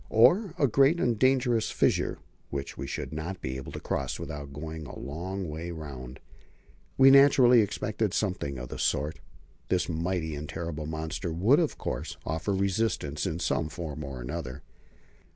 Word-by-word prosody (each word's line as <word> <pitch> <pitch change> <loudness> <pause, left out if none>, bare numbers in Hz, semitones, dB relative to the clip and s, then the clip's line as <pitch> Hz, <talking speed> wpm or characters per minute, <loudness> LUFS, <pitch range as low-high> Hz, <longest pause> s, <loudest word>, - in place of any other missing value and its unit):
Or 160 - +5
a 145 - +4
great 140 +8 +4
and 120 -7 +1
dangerous 125 -3 +3
fissure, - - +1 0.3
which 70 0 -4
we - - -5
should - - -4
not 85 +5 -4
be 65 -5 -4
able 65 - -7
to - - -5
cross 65 -2 -2
without 70 -1 -6
going 80 +1 -6
a - - -9
long 90 +7 -4
way 80 +3 -5
round? 70 -6 -7 0.8
We 135 0 +8
naturally 135 -3 +7
expected 105 0 -1
something 90 -11 -1
of 65 -1 -6
the - - -6
sort. 75 +3 0 0.5
This 90 -2 +1
mighty 85 -1 -1
and 75 0 -6
terrible 80 -3 -4
monster 80 +2 -3
would, 100 - +4
of 165 -4 0
course, - - -4
offer 80 +6 -2
resistance 95 -6 0
in 80 -3 -2
some 85 -2 0
form 80 -2 -6
or 65 -4 -6
other. 70 -5 -5
85 Hz, 165 wpm, -28 LUFS, 75-110 Hz, 0.8 s, We